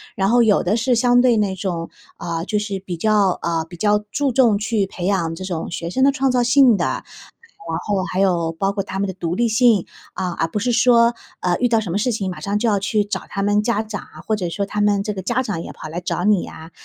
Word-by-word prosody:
然 195 - +1
后 240 0 +5
有 220 -3 +3
的 185 +4 +1
是 245 +2 +1
相 245 +1 +4
对 245 -2 +4
那 200 -3 0
种， 175 -3 -4 0.3
呃， 170 -1 -4
就 210 - -1
是 205 -2 -3
比 185 -2 -6
较 205 -1 +2
呃， 165 -1 0
比 175 - -10
较 210 +3 +2
注 285 -1 0
重 235 -4 +4
去 205 -1 -1
培 180 -2 -6
养 175 -4 0
这 185 - -7
种 175 -4 -4
学 170 0 -5
生 260 +7 +1
的 280 - +5
创 270 -1 0
造 250 -1 +2
性 245 0 +5
的， - - 0
然 - - -2 0.8
后 200 -3 0
还 185 - 0
有 175 -4 +1
包 195 +4 -1
括 200 0 -2
他 190 - -6
们 200 0 -1
的 190 - -4
独 170 -2 -3
立 235 +4 +1
性。 220 -3 +3 0.3
啊， 185 -2 -3
而 165 - -1
不 185 - -3
是 245 +4 0
说， 235 0 +4 0.3
呃， 175 -1 +1
遇 245 - +2
到 225 -2 +2
什 215 - -6
么 175 - -1
事 240 +4 0
情 195 -4 -2
马 180 - -7
上 200 +1 -1
就 235 +2 0
要 205 -2 +2
去 205 +2 0
找 200 -2 -4
他 195 - -3
们 205 +1 +2
家 220 -1 0
长， 215 -1 -6 0.2
或 215 - +1
者 180 -4 -3
说 200 +3 -2
他 210 +1 -2
们 205 -1 +2
这 210 0 -3
个 190 - -5
家 240 +7 0
长 205 -9 -4
也 - - -8
跑 - - -9
来 165 +3 -5
找 175 - -2
你 210 -3 +3
呀， 160 +1 -10
205 Hz, 285 characters per minute, -20 LUFS, 185-230 Hz, 0.8 s, 后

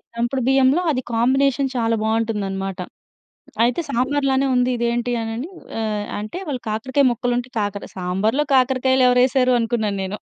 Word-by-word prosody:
దంపుడు 240 +3 -1
బియ్యంలో 270 +4 +4
అది 255 - -1
కాంబినేషన్ 270 +3 +2
చాలా 230 -1 +1
బావుంటుందనమాట. 200 -4 -2 0.9
అయితే 245 +7 +1
సాంబార్లానే 275 +1 +1
ఉంది, 250 0 +2
ఇది 235 0 -1
ఏంటి 240 +1 -1
అనని, 225 +8 -5 0.3
ఆహ్, 210 -1 -2
అంటే 215 +11 -6
వాళ్ళు 260 -4 -3
కాకరకాయ 260 +6 0
ముక్కలుంటే, 245 +1 -1
కాకర 205 -1 -2
సాంబార్లో 195 +10 0
కాకరకాయలు 260 0 +3
ఎవరేశారు 255 +1 +3
అనుకున్నాను 225 -3 -1
నేను. 190 +2 -4
245 Hz, 135 wpm, -21 LUFS, 220-260 Hz, 0.9 s, బియ్యంలో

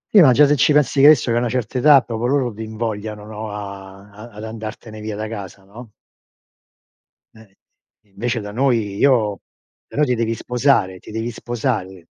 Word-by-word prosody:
Sì, 195 - +9
ma 135 -5 +7
già 145 +4 +6
se 145 +1 +3
ci 145 +3 +3
pensi 145 -1 +2
che 145 - +8
hai 155 - +10
visto, 120 -4 -2
che 115 - +1
a - - +3
una 120 -1 -1
certa 125 +1 -2
età, 145 -1 +6
proprio 115 +1 -3
loro 130 -4 0
ti 110 - -9
invogliano, 110 -1 -5
no, 110 0 -7
a 100 -1 -9
ad 110 +4 -12
ad 105 - -8
andartene 110 0 -8
via 105 -1 -5
da 110 +1 -4
casa, 100 -3 -8
no? 110 +3 -13 1.4
Eh. 110 -3 -18 0.5
Invece 115 +3 -3
da 105 0 -7
noi 115 -5 0
io 110 -7 +2 0.5
però 150 - -1
ti 125 -3 +1
devi 115 0 -1
sposare, 125 -8 +1
ti - - -15
devi 115 +2 -3
sposare 110 -7 -4
110 Hz, 190 wpm, -20 LUFS, 105-125 Hz, 1.4 s, hai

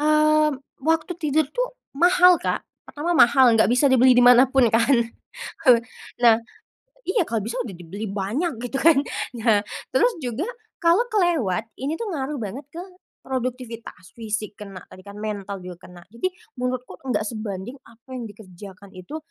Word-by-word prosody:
eee, 305 0 +4 0.3
waktu 325 +3 +1
tidur 310 -1 +1
tuh - - -3 0.2
mahal 360 +3 +5
Kak. - - -2 0.2
Pertama 335 +4 -3
mahal 250 -2 +6
enggak 220 0 +3
bisa 250 +4 +3
dibeli 260 -1 +5
di 245 - +6
mana 245 +1 +8
pun 265 -2 +4
kan, 230 +4 +4 0.7
eee, 245 -2 +8 0.4
nah 230 -2 +6 0.7
iya, 380 +3 +1
kalau 225 -1 -1
bisa 235 +3 -4
udah 225 -6 -7
dibeli 180 +5 -7
banyak 225 - -2
gitu 260 +2 -3
kan, 325 -2 +5 0.4
nah, 220 -2 +3 0.3
terus - - +4
juga 250 +5 -3 0.4
kalau 345 +8 +4
kelewat 315 - +1 0.2
ini 280 +3 -2
tuh 460 - -4
ngaruh 285 0 -3
banget 225 +7 -6
ke 340 - -6 0.4
produktivitas, 245 -7 -6
fisik 220 -2 -4
kena 195 -3 -9
tadi 185 - -13
kan, 200 - -10
mental 205 -2 -4
juga 180 -1 -10
kena, 180 -1 -13
jadi 370 +11 -1 0.3
menurutku 250 0 -4
enggak 255 - 0
sebanding 215 +2 -6
apa 230 +3 -21
yang 240 - -5
dikerjakan 195 -1 -13
itu, 185 - -7
245 Hz, 160 wpm, -23 LUFS, 215-305 Hz, 0.7 s, mana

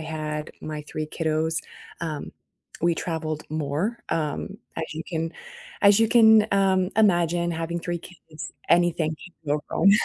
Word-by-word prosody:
had 155 -1 -4
my 155 -1 -5
3 155 0 -3
kiddos, 160 0 0 0.4
um, 155 -3 -4 0.5
we 170 0 +3
traveled 160 -2 -3
more, 155 +9 -1
um, 160 +5 -2 0.2
as 160 - -1
you 160 - -4
can 165 -1 -2 0.5
as 200 0 +7
you 225 - +4
can, 220 -2 +7
um, 190 -1 +3
imagine 175 -5 +3
having 165 +1 -2
3 175 0 -2
kids, 160 -3 -10 0.2
anything 170 -2 +3
can 175 - -13 0.2
go - - -5
wrong, 195 - +5
165 Hz, 145 wpm, -25 LUFS, 155-180 Hz, 0.5 s, as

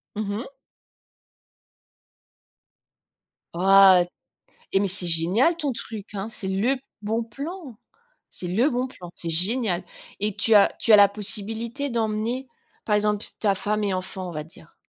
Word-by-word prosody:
Mmh 210 -1 -3
mh. 265 +4 -7 3.0
Waouh, 190 0 +6 0.7
eh 195 - +3
mais 200 - +1
c'est 185 -1 -3
génial 180 - +2
ton 290 -5 -2
truc, 215 -3 -8
hein. 200 +2 -4
C'est 195 -3 -4
le 220 +8 +1 0.2
bon 220 +2 -1
plan, 280 - -8 0.5
c'est 180 - -3
le 230 +11 +2
bon 250 +1 -1
plan. 180 -8 -11
C'est 165 - -4
génial 185 +1 +2 0.4
et 210 -1 -1
tu 225 - +2
as 200 - +6
tu 225 - +3
as - - +10
la 200 -1 +7
possibilité 225 +6 -2
d'emmener 230 +2 -2 0.4
par 210 -1 +2
exemple 210 0 0
ta 200 -2 +2
femme 210 +2 -1
et 195 -2 0
enfant, 185 0 -5
on 175 - -6
va 155 -1 -4
dire? 165 0 -18
210 Hz, 150 wpm, -24 LUFS, 190-235 Hz, 3.0 s, as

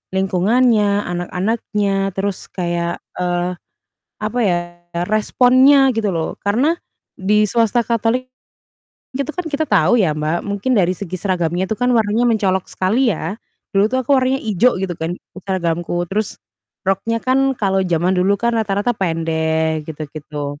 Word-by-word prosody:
lingkungannya, 205 +2 +2
anak-anaknya, 195 +2 -1
terus 195 -1 -3
kayak, 170 -1 -3 0.2
eee, 175 0 0 0.7
apa 215 +3 -3
ya, 185 -4 +2 0.5
responnya 255 +5 +4
gitu 215 -3 0
loh. 165 -2 -2
Karena 245 +11 +2 0.4
di 210 +2 +2
swasta 230 +1 +1
Katolik, 235 +2 0 0.9
itu 275 +2 -3
kan 360 - -2
kita 315 -1 -2
tahu 240 - +4
ya 165 -7 +2
Mbak, 155 +3 -1
mungkin 205 +5 -1
dari 185 -5 +2
segi 185 -2 -6
seragamnya 180 -1 -1
itu 220 - -2
kan 245 +1 +1
warnanya 225 0 +2
mencolok 200 -5 +1
sekali 225 +6 +2
ya. 185 +2 -4 0.4
Dulu 195 +1 +4
tuh 260 - +2
aku 270 +2 +2
warnanya 260 +1 +1
ijo 220 +1 +2
gitu 185 -2 -2
kan 160 +2 -3 0.3
seragamku, 175 -2 -1
terus 210 +2 -2 0.5
roknya 195 +4 0
kan 270 +1 +2
kalau 195 -3 +1
jaman 175 -1 +1
dulu 190 +2 +2
kan 235 +3 0
rata-rata 215 0 0
pendek 160 -4 -1
gitu-gitu. 145 -1 -6
200 Hz, 140 wpm, -19 LUFS, 175-235 Hz, 0.9 s, responnya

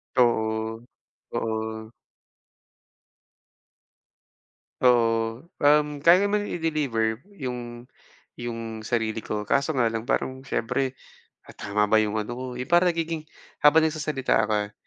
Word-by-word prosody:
Oo. 110 -2 +1 0.5
Oo. 110 0 -3 2.9
Oo, 115 -2 +3 0.2
um, 150 +1 +5 0.2
kaya 170 +2 +8
naman 205 0 0
i-deliver 140 - -1 0.2
yung, 120 -1 -6 0.5
yung 115 -2 -5
sarili 110 -1 -1
ko, 105 0 -4
kaso 140 +7 +1
nga 125 - +3
lang 115 +1 -4
parang 130 0 -1
siyempre, 130 0 -2 0.5
"Ah, - - -16
tama 105 0 0
ba 110 - +5
'yong 110 0 +1
ano 105 - -6
ko" 130 - -5
yung 125 - -5
parang 175 0 +4
nagiging 165 -1 -3 0.4
habang 150 +2 +7
nagsasalita 150 -7 +1
ka 105 -1 -1
120 Hz, 115 wpm, -25 LUFS, 110-145 Hz, 2.9 s, kaya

